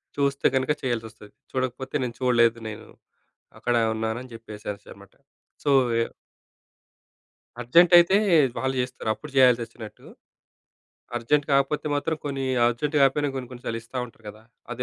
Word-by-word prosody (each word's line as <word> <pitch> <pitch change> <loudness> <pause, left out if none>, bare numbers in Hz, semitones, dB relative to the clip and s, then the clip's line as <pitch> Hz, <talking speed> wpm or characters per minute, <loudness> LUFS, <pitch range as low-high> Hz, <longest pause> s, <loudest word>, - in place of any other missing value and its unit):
చూస్తే 140 -1 +1
గనక 130 +2 +1
చేయాల్సి 120 -4 -2
ఓస్తది. 105 -1 -17 0.2
చూడకపోతే 130 +1 -3
"నేను 120 -1 -4
చూడలేదు 120 -2 +3
నేను 110 +1 -9 0.7
అక్కడే 120 -1 +1
ఉన్నాను" 110 0 -2
అని 130 - -13
చెప్పేసేసాల్సి 105 -2 -8
అన్నమాట. - - -18 0.5
సో - - 0 1.9
అర్జెంటైతే 175 +8 +6 0.4
వాళ్ళు 130 0 -1
జేస్తారు. 125 -3 -3
అప్పుడు 150 +5 -11
చేయాల్సొచ్చినట్టు. 120 -3 +1 1.1
అర్జెంట్ 140 +5 +1
కాకపోతే 140 +2 +1
మాత్రం 160 +2 -1
కొన్ని 135 -2 -3 0.2
అర్జెంట్ 145 +6 -2
కాకపోయినా 145 +2 +3
కొన్నికొన్ని 125 -1 -8
సార్లు 115 0 -3
ఇస్తా 125 +2 -7
ఉంటారు 115 -1 -20
కదా! 105 +1 -17 0.3
అది 125 +1 -4
125 Hz, 125 wpm, -25 LUFS, 115-140 Hz, 1.9 s, అర్జెంటైతే